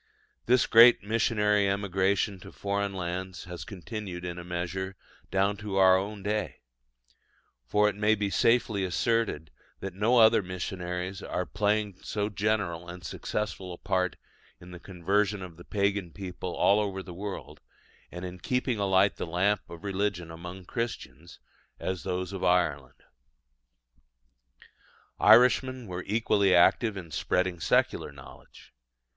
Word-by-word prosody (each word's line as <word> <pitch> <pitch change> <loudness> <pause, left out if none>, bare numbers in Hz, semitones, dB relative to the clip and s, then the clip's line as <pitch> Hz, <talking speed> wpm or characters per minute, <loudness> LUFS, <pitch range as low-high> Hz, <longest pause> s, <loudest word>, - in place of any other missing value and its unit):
This 125 0 +4
great 115 -1 +7
missionary 105 -2 +2
emigration 100 0 0
to - - -12
foreign 100 0 -2
lands 90 +1 -4
has 90 -1 -7
continued 95 -2 -7
in 90 0 -5
a - - -7
measure 90 +2 -4 0.3
down 100 +2 +1
to 105 -1 -5
our 95 -1 +6
own 100 +1 -3
day: 105 +1 -2 1.1
for 105 +6 +3
it 105 - 0
may 105 +1 +3
be 100 -1 -2
safely 115 -4 +2
asserted 95 -4 0 0.3
that 95 -2 -6
no 110 +6 +2
other 110 -2 +6
missionaries 90 0 -5
are 90 - -3
playing 105 -1 -1
so 105 0 -2
general 100 -5 -1
and 90 0 -9
successful 95 +3 -4
a - - -9
part 90 -3 -1 0.4
in 90 - -13
the 90 - -9
conversion 100 +3 -1
of 90 -3 -9
the 85 - -13
pagan 100 -2 -1
people 90 -1 -6
all 100 +2 +4
over 95 -2 -2
the 90 0 -9
world, 100 +2 -7 0.5
and 90 +1 -6
in 90 0 -8
keeping 125 +1 -1
alight 100 0 +3
the - - -4
lamp 95 +5 +1
of 85 +2 -10
religion 100 -4 -2
among 90 +3 -9
Christians, 90 - -6 0.4
as 95 -1 -3
those 90 0 -3
of 95 - -5
Ireland. 75 -8 0 2.2
Irishmen 130 0 +5
were 90 -2 -5
equally 100 -3 +3
active 100 +4 +4
in 85 -4 -8
spreading 90 +3 0
secular - - +1
knowledge. 65 -3 -15
95 Hz, 140 wpm, -28 LUFS, 90-105 Hz, 2.2 s, great